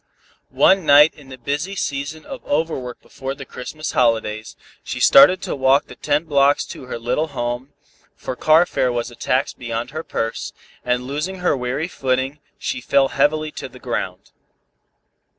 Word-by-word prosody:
One 190 -1 +4
night 150 +1 +7
in 140 -3 -16
the 130 - -9
busy 145 +10 -3
season 145 -1 -4
of - - -8
overwork 145 -5 -2
before 135 0 -6
the 140 -1 -9
Christmas 155 +5 -6
holidays, 110 -2 0 0.3
she - - -5
started 275 -10 +7
to - - -3
walk 135 +1 +3
the - - -12
ten 150 +1 0
blocks 145 -2 +3
to - - -11
her 125 - -5
little 125 +7 -1
home, 125 0 -4 0.4
for - - -5
car 155 +6 +5
fare 125 -7 0
was 120 0 -3
a - - -13
tax 130 +3 0
beyond 120 0 -5
her 155 +2 -5
purse, 115 -6 -3 0.3
and 125 0 0
losing 150 +8 -3
her 180 -4 +1
weary 130 +5 -2
footing, 135 -2 -1 0.2
she 125 - -3
fell 135 +2 +3
heavily 155 +2 +1
to - - -7
the - - -14
ground. - - -4
140 Hz, 170 wpm, -21 LUFS, 125-155 Hz, 0.4 s, night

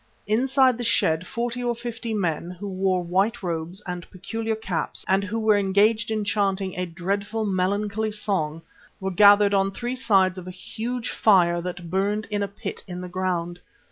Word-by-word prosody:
Inside 255 +3 +3
the - - -2
shed 165 -6 +2
forty 240 +1 -3
or 240 -1 0
fifty 235 0 -5
men, 175 -5 -1
who 180 +3 -7
wore 185 -1 0
white 195 +6 0
robes 170 +3 -3
and 180 -1 -6
peculiar 225 +4 -3
caps 195 -6 -3
and 195 +1 +3
who 205 +3 -3
were 215 -2 +3
engaged 210 +4 +3
in 215 -1 -1
chanting 195 -2 0
a 180 0 -2
dreadful, 200 +6 -2
melancholy 205 +3 0
song, 175 -7 -2 0.4
were 190 0 -2
gathered 205 +2 +6
on 195 0 +3
three 240 +6 -4
sides 195 -7 +2
of 180 - -10
a - - -4
huge 225 +6 -4
fire 175 -5 +4
that 175 -1 -6
burned 205 +3 0
in 205 -1 0
a 200 - 0
pit 200 +1 -6
in 180 -1 -6
the 180 - -6
ground. 175 -1 -2
200 Hz, 175 wpm, -24 LUFS, 180-220 Hz, 0.4 s, gathered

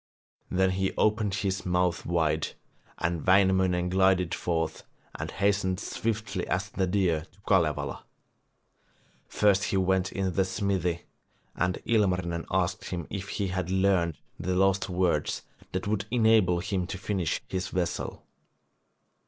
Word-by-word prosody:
Then 95 0 +2
he 95 +1 -1
opened 105 -2 +2
his 100 -1 -1
mouth 90 -1 0
wide, 80 -2 0 0.4
and 85 -2 -1
Wainamoinen 95 -2 +3
glided 95 -1 +3
forth 80 -2 -2 0.3
and - - -5
hastened 100 -2 +1
swiftly 110 -4 -3
as 90 +1 -1
the 95 -1 0
deer 90 -5 +1
to - - -26
Kalevala. 75 -7 +1 1.2
First 100 -1 +3
he 95 - 0
went 95 0 +1
into 95 -1 -1
the 95 +2 +2
smithy, 95 -3 -1 0.5
and 90 0 0
Ilmarinen 90 -6 +1
asked 90 -2 0
him 85 -3 -4
if 100 0 -5
he 100 -2 -2
had 90 -1 -2
learned 95 -4 +2 0.2
the 90 +3 -1
lost 95 +1 +2
words 90 -4 0 0.3
that 95 - -2
would 105 -1 -1
enable 110 -7 +4
him 95 -2 -2
to 100 - -5
finish 95 -4 -1
his 95 -1 -2
vessel. 90 -2 -3
95 Hz, 135 wpm, -28 LUFS, 90-100 Hz, 1.2 s, enable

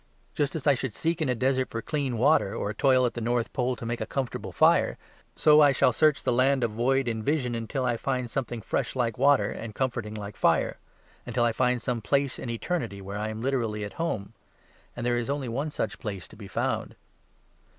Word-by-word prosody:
Just 145 +1 -1
as 155 - -4
I 145 - +6
should 125 -4 -4
seek 165 0 -1
in 150 - +1
a 125 - +2
desert 130 +2 +1
for 115 - -4
clean 135 -2 -2
water, 135 -4 +3
or 105 - -2
toil 130 +2 +3
at 120 - -1
the 120 - -5
North 120 0 -1
Pole 125 -2 0
to 115 - -8
make 120 0 -3
a 110 - -2
comfortable 135 -1 -3
fire, - - +3 0.4
so 155 0 +6
I 145 -1 +7
shall 130 -1 +3
search 155 +2 +3
the - - +1
land 130 +1 +3
of 115 - 0
void 130 +4 +1
and 110 -2 -2
vision 135 -3 0
until 120 +3 -2
I 120 -2 +1
find 125 0 -2
something 120 -2 -4
fresh - - -2
like 120 -2 -1
water, 135 -7 +4
and 110 -2 -7
comforting 120 -5 -2
like 105 -1 -6
fire; - - +2 0.5
until 120 - 0
I 120 - +3
find 125 +1 +1
some 120 -3 -1
place 140 +4 0
in 125 - -5
eternity, 115 - -3
where 100 +1 -6
I 110 +1 -2
am 110 +1 -5
literally 115 -6 -1
at 100 - -6
home. 110 -12 -2 0.6
And 120 - -4
there 120 0 +2
is 120 - -4
only 140 -2 -2
one 135 +6 -2
such - - -3
place 100 -5 -5
to - - -14
be - - -10
found. - - -2
125 Hz, 225 wpm, -27 LUFS, 115-135 Hz, 0.6 s, I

